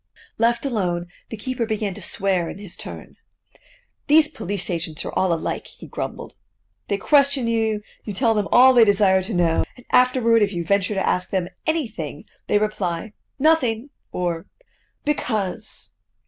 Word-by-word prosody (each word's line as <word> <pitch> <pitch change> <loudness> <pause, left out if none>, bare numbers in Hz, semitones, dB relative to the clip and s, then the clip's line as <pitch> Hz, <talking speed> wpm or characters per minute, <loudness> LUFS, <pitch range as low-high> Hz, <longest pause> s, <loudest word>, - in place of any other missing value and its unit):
Left 235 +3 +2
alone, 180 -9 -1 0.2
the 225 - -6
keeper 240 +1 -3
began 215 -3 -2
to 205 - -9
swear 185 -1 0
in - - -7
his 200 -3 -9
turn. - - -10 0.9
"These 300 +1 +6
police 200 - -4
agents 165 -2 -4
are - - -5
all 190 -1 +2
alike," 165 -1 -2
he - - -13
grumbled. - - -6 0.5
"They 200 - 0
question 280 +2 +3
you, 220 -2 0 0.2
you 210 - -5
tell 225 +2 +2
them 210 -2 0
all 260 +1 +8
they 240 -2 +7
desire 200 -2 +4
to 200 +4 -5
know; 170 -2 +2
and 245 - -16
afterward, 250 -3 +4
if 205 -1 +2
you 170 -1 -3
venture 200 +3 +1
to 195 - 0
ask 180 - 0
them 185 -2 -1 0.2
anything, 220 - -2 0.2
they - - +3
reply: 205 -2 -2 0.2
'nothing,' 275 -4 +2 0.2
or 170 -2 -2 0.6
'because. 220 -10 -3
210 Hz, 160 wpm, -22 LUFS, 180-240 Hz, 0.9 s, all